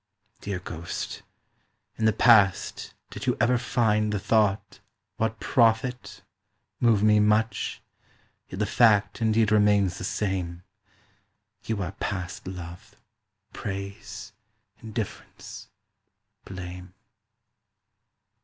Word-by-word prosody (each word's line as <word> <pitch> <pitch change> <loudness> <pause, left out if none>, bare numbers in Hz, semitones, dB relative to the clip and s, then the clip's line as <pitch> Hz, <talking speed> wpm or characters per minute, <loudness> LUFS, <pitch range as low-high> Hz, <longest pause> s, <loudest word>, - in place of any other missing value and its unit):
Dear 100 -2 -4
ghost, 85 -2 -6 0.7
in 110 - -1
the 110 - +5
past 105 -5 +3 0.2
did - - -7
you - - +2
ever 120 +1 +3
find 110 -3 +1
The 105 - 0
thought 105 0 +1 0.4
"What 110 0 -1
profit?" 120 +1 +1 0.6
move 115 -4 +3
me 105 0 +5
much 105 +2 +1 0.6
Yet 90 - -8
the 105 - +1
fact 105 -1 +3
indeed 110 -1 +3
remains 105 -3 +3
the - - -6
same, 90 -4 -2 1.0
You 110 -3 -2
are 90 - -4
past 95 -2 -5
love, 90 -2 -9 0.6
praise, 100 +1 -6 0.5
indifference, 110 -2 -7 0.8
blame. 90 -1 -8
105 Hz, 100 wpm, -26 LUFS, 95-110 Hz, 1.0 s, the